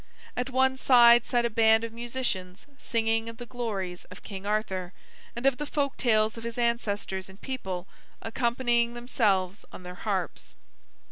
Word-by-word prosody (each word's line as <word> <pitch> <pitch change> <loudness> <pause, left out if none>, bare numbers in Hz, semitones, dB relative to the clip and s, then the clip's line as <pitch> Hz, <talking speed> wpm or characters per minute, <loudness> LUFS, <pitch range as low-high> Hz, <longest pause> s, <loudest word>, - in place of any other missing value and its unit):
At 250 +2 -2
one 260 0 +2
side 240 -2 +6
sat 240 -1 +2
a - - +1
band 220 0 +4
of 230 -1 -5
musicians 230 -6 -3
singing 225 0 0
of 230 - -10
the 245 - -7
glories 210 -7 -4
of - - -13
King 195 -1 -7
Arthur, 190 -4 -2 0.4
and 240 +2 -5
of 275 -2 +4
the 295 - -4
folk 280 -2 -1
tales 220 -2 +2
of 230 - -8
his 235 0 -5
ancestors 205 -5 -1
and 190 +1 -14
people, 190 -10 -4 0.3
accompanying 235 0 0
themselves 205 -5 0
on - - -10
their 180 0 -7
harps. 190 -1 -4
230 Hz, 160 wpm, -28 LUFS, 195-240 Hz, 0.4 s, side